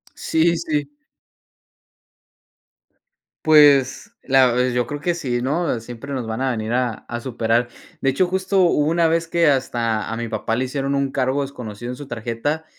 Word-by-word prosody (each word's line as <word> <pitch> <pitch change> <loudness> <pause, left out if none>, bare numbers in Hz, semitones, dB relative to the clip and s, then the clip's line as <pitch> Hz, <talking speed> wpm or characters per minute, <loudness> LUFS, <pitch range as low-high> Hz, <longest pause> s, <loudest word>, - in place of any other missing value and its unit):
Sí, 170 +1 +1
sí. 155 -3 -2 2.6
Pues 145 - +5
la 130 -2 +4
pues 125 +1 +1
yo 125 -1 +1
creo 145 +4 -6
que 175 +2 0
sí, 125 -7 -2
¿no? 145 0 -1
Siempre 120 +4 -8
nos 125 -4 -3
van 110 +3 -4
a 135 0 +1
venir 110 -1 -3
a 125 -1 +1 0.2
a 120 - -4
superar. 120 -1 0 0.3
De 135 - +1
hecho, 180 +7 +1
justo 190 +2 0
hubo 150 -4 +3
una 165 +1 +3
vez 165 +1 0
que 170 -1 +2
hasta 120 -6 0
a - - -2
mi 115 0 -4
papá 110 +1 -2
le 130 +2 -1
hicieron 135 +1 -2
un 140 -1 0
cargo 135 +1 0
desconocido 120 -4 -6
en - - -6
su 145 +1 -10
tarjeta 120 +7 -3
135 Hz, 175 wpm, -21 LUFS, 120-150 Hz, 2.6 s, Pues